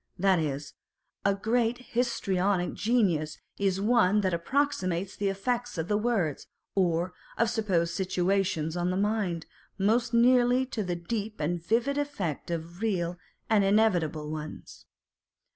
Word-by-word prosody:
That 190 -1 +3
is, 145 -2 -3 0.5
a 200 0 +3
great 230 +3 +1 0.2
histrionic 195 -6 +1
genius 185 -10 +1 0.2
is 195 -1 +1
one 210 -2 +3
that 185 -2 0
approximates 185 -3 0
the 200 -1 0
effects 240 +4 -2
of 165 +4 -3
words, 205 - 0 0.3
or 180 -1 +1 0.2
of 230 0 +2
supposed 185 -7 0
situations 185 -3 0
on 175 0 0
the 185 - 0
mind, 200 -5 0 0.3
most 230 +4 +2
nearly 245 +1 +4
to 245 -4 -4
the 180 -2 -2
deep 210 +5 -4
and 165 +2 -1
vivid 245 +9 +1
effect 200 - -3
of 170 +2 -5
real 180 -5 -1 0.3
and 215 -3 +4
inevitable 175 -7 +2
ones. 155 0 -8
195 Hz, 130 wpm, -28 LUFS, 170-225 Hz, 0.5 s, nearly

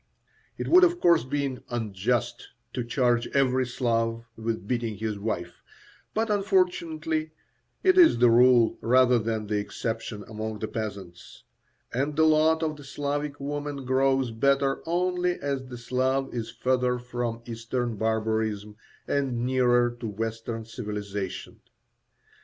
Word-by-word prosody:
It - - -4
would, 365 +2 +7
of 350 0 +4
course, 170 - +4
be 135 -1 -2
unjust 110 0 -2 0.3
to 125 - -2
charge 120 -1 +1
every 130 -2 +2
Slav 115 -2 -1
with 110 -3 -4
beating 120 -3 -1
his 110 -1 -3
wife, 90 -5 -4 0.5
but, 220 0 +1
unfortunately, 165 -5 0 0.5
it 370 0 +5
is 340 - +7
the 120 0 +5
rule 120 -1 +5
rather 125 0 +4
than 110 -1 -2
the 105 0 -1
exception 110 0 -4
among 110 0 -5
the 110 - -4
peasants; 100 -6 -7 0.5
and 140 +4 -1
the 160 - +4
lot 160 +1 +4
of 155 -1 -2
the 145 - -11
Slavic 145 +1 -3
woman 145 -1 -4
grows 130 -1 +2
better 135 +4 +1
only 180 +1 +1
as 135 -2 -3
the 125 -1 -8
Slav 130 +3 -1
is 115 -2 -3
further 125 +1 0
from 120 -1 -4
Eastern 115 0 -3
barbarism 110 -1 -1 0.3
and 130 -4 0
nearer 120 -2 +3
to 115 - -4
Western 115 +1 -4
civilization. 105 -4 -5
125 Hz, 135 wpm, -27 LUFS, 110-140 Hz, 0.5 s, would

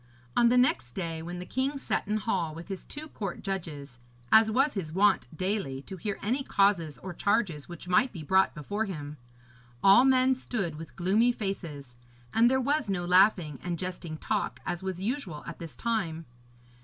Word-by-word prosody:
On 235 - +5
the 250 - +4
next 190 - +2
day, 165 -3 -3
when 175 +2 -6
the 180 - -6
king 265 +7 -1
sat 270 - -2
in 210 +1 +1
hall 175 -6 -1
with 165 +4 -9
his 190 -2 -6
two 300 +2 -7
court 200 - -5
judges, 150 - -5 0.3
as 220 0 +7
was 270 +6 +2
his 180 -7 -4
wont 200 +5 +3
daily, 185 -9 -2
to 190 - -8
hear 200 +3 -3
any 245 +7 0
causes 195 - +2
or 185 -1 -5
charges 180 -6 0
which 175 0 -9
might 245 +8 +3
be 170 -6 -8
brought 190 +5 +3
before 205 +9 -2
him, 150 -6 -6 0.7
all 200 +5 +8
men 260 0 +4
stood 205 -11 -3
with 165 - -10
gloomy 210 +7 +3
faces, 170 - -5 0.4
and 230 +2 +5
there 265 +1 +2
was 280 -2 0
no 180 -3 -1
laughing 180 -5 +4
and 175 -1 -3
jesting 175 -3 -5
talk, - - -2
as 175 - -2
was 190 -2 -4
usual 195 - -3
at 170 - -8
this 165 -2 -7
time. 175 -9 -2
190 Hz, 185 wpm, -29 LUFS, 165-220 Hz, 0.7 s, all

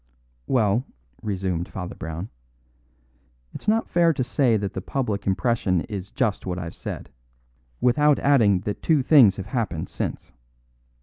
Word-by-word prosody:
"Well," 115 -2 +2 0.4
resumed 95 -4 -2
Father 90 -2 -6
Brown, 80 +5 -6 1.2
"it's - - -10
not 225 +2 +2
fair 170 -1 +3
to 130 - -1
say 125 -2 +2
that 100 -1 -3
the 95 - -4
public 105 -3 -3
impression 95 -3 +1
is 100 -1 -6
just 115 -6 -1
what 90 -1 -2
I've 85 -2 -5
said, - - -7 0.7
without 145 +4 +4
adding 110 -10 +3
that 105 +1 -4
two 155 -5 +2
things 125 -10 +6
have 95 - -6
happened 95 -11 -3
since. - - -5
105 Hz, 140 wpm, -24 LUFS, 95-130 Hz, 1.2 s, things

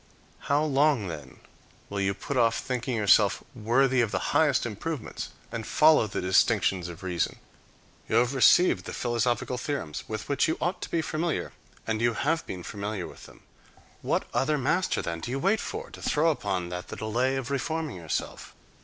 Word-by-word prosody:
How 145 +2 +3
long, 140 - +2
then, 80 -3 -9 0.5
will 100 0 -3
you 100 0 0
put 140 +8 -5
off 115 -2 +3
thinking 125 -1 -2
yourself 105 -3 +4
worthy 125 +3 +2
of 115 - +1
the - - -2
highest 145 -4 +3
improvements 120 +5 -5 0.2
and 115 -1 -3
follow 155 -7 +5
the - - -3
distinctions 95 -1 +2
of 85 +1 -10
reason? 90 -3 -1 0.7
You - - +1
have 120 +3 +3
received 155 +7 +5
the - - -6
philosophical 120 +1 -1
theorems, 130 - -4
with 110 -1 -5
which 140 -1 +2
you 160 - 0
ought 175 +2 -1
to - - -5
be 165 -1 0
familiar, 160 +1 -2 0.3
and 110 0 -1
you 120 0 +3
have 160 +3 0
been 90 -2 -6
familiar 100 0 -4
with - - -11
them. - - -17 0.6
What - - 0
other 150 +3 +1
master, 160 +7 0
then, 85 0 -3
do 120 - -6
you 130 - -1
wait 195 +9 +2
for, - - -5
to - - -11
throw 160 +3 +2
upon 95 - -2
that 90 0 -5
the - - -7
delay 120 +5 0
of 135 0 -4
reforming 155 0 -2
yourself? 80 -3 -4
120 Hz, 180 wpm, -27 LUFS, 100-145 Hz, 0.7 s, follow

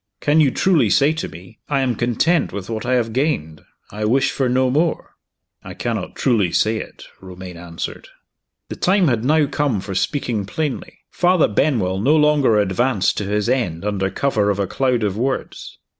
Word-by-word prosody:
Can 150 +2 +3
you 145 - +4
truly 175 +4 +2
say 145 +2 +3
to 160 - -4
me, 90 +7 -14
'I 140 -2 +1
am 125 -3 0
content 125 +9 +1
with 100 +2 -6
what 110 -1 -4
I 130 - +1
have 115 -2 -1
gained; 120 - -1 0.3
I 105 +1 -5
wish 130 +5 +2
for 130 -2 -1
no 130 +1 +2
more'?" 160 +4 0 0.5
"I - - -9
cannot - - -4
truly 105 -9 +1
say 110 +5 +1
it," - - -9 0.2
Romayne 90 -1 -10
answered. 85 0 -7 0.6
The - - -6
time 185 -3 +3
had 120 -3 0
now 150 +3 +3
come 140 -6 -1
for 95 +1 -6
speaking 110 - -2
plainly. 150 +4 -4
Father 180 -2 +3
Benwell 100 -6 0
no 140 +9 +3
longer 150 -7 +3
advanced 105 +2 +1
to 100 - -2
his 105 +2 -1
end 105 -9 -1
under 100 -2 -1
cover 110 -4 0
of 100 - 0
a 100 - 0
cloud 125 +2 0
of 100 -1 -1
words. 130 +3 -4
120 Hz, 185 wpm, -20 LUFS, 100-145 Hz, 0.6 s, you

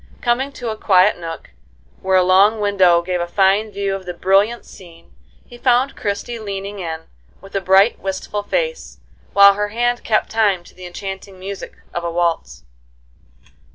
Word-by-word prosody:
Coming 255 +3 0
to 240 -4 -5
a - - -4
quiet 195 -2 +3
nook, 165 -1 -8 0.5
where 190 0 +2
a 185 - +4
long 195 +4 +4
window 190 -4 +3
gave 180 0 -2
a 175 - -2
fine 195 +3 +2
view 200 0 -2
of 190 -1 -6
the 180 - -5
brilliant 200 +6 +1
scene, 170 -3 -16 0.3
he 240 - -14
found 255 +2 +2
Christie 220 +3 -4
leaning 200 -1 -6
in, 160 -3 -5 0.4
with 195 +1 -15
a 195 - -1
bright, 190 +4 +4
wistful 195 +2 -4
face, 480 - -3 0.4
while 200 0 +8
her 210 +1 -2
hand 240 +3 -1
kept 215 -2 0
time 205 -5 +1
to - - -18
the 185 -1 -10
enchanting 190 +1 -8
music 195 +1 -8 0.2
of 175 - -3
a 170 - -2
waltz. 165 - -2
195 Hz, 170 wpm, -19 LUFS, 180-215 Hz, 0.5 s, while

